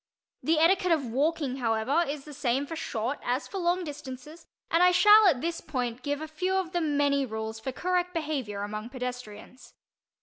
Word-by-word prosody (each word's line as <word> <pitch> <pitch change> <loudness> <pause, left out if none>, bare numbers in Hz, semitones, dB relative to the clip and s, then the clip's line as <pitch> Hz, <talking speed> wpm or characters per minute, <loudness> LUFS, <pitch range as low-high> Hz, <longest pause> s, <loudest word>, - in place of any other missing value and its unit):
The 320 0 +2
etiquette 360 +3 +3
of 300 -5 0
walking, 275 +2 0
however, 235 +6 +1
is 285 -1 -5
the 300 - -10
same 270 0 0
for 325 - -6
short 245 -2 -3
as 250 +4 -1
for 390 - -5
long 355 +1 +1
distances, 295 0 -9 0.2
and 330 - +4
I 360 - +7
shall 420 +3 +7
at 275 -9 +3
this 335 0 -2
point 250 -2 -3
give 290 +2 -2
a 315 - -4
few 365 +5 -2
of 375 -3 -1
the 350 -2 0
many 285 -2 +2
rules 220 -2 -5
for 265 +4 -4
correct 360 +5 -1
behavior 280 - -3
among 215 +2 -5
pedestrians. 250 -2 -8
285 Hz, 190 wpm, -28 LUFS, 250-330 Hz, 0.2 s, I